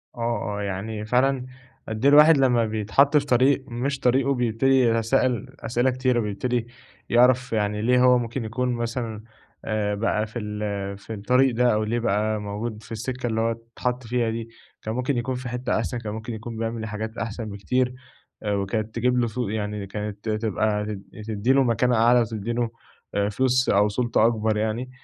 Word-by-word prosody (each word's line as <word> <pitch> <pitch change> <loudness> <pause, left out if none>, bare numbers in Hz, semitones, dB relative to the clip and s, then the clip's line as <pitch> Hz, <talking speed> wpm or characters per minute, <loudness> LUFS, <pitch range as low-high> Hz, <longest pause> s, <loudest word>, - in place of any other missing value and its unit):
آه، 115 -3 -2
آه، - - -3
يعني 105 +2 -4
فعلًا 125 +3 +2 0.4
أد 110 +3 -3
إيه - - +8
الواحد 150 +1 +8
لمّا 125 -4 +3
بيتحط 110 +7 +3
في 145 - +1
طريق 130 +1 +3
مش 130 +3 -2
طريقه، 130 +2 +2
بيبتدي 125 +2 +2
يتسائل 120 +2 +1
أسئلة 120 +3 +1
كتيرة، 130 -1 +1
بيبتدي 115 +3 -2 0.4
يعرف 125 +1 +4
يعني 105 -1 0
ليه 125 +2 +3
هو 125 0 +6
ممكن 120 0 -3
يكون 125 +3 -1
مثلًا 115 -2 -3 0.4
آآ، 105 -1 -1
بقى 110 0 0
في 110 +3 -6
ال 105 -2 -4
في 105 +3 -8
الطريق 125 +5 +2
ده 125 0 +3
أو 105 0 +1
ليه 115 +3 -1
بقى 110 -1 0
موجود 105 +2 -5
في - - -15
السكة 125 +3 -3
اللي 115 -1 0
هو 115 0 +1 0.2
أتحط 125 +1 -2
فيها 120 0 0
دي، 115 0 -4 0.3
كان 110 - -4
ممكن 125 +1 -1
يكون 125 +2 -2
في 125 0 -5
حتّة 125 +1 -2
أحسن، 110 +1 -2
كان 105 -3 -5
ممكن 110 +2 -6
يكون 115 +1 -7
بيعمل 115 0 -3
حاجات 110 +1 -5
أحسن 115 +1 -4
بكتير 125 +5 -1 0.5
وكانت 105 +2 -1
تجيب 125 +2 +1
له 120 -1 +2
س 110 - -9
يعني 105 -1 -3
كانت 105 +1 -5
تبقى 105 -1 0
ت 105 -1 -4 0.3
تدّي 110 +4 +1
له 135 0 +4
مكانة 125 0 +2
أعلى 120 +2 +5
وتدّي 110 -1 -3
له 120 -1 0 0.6
فلوس 130 +4 +1
أو 100 +1 +4
سلطة 115 0 +2
أكبر 110 -2 +1
يعني 110 +4 -2
115 Hz, 180 wpm, -24 LUFS, 110-125 Hz, 0.6 s, إيه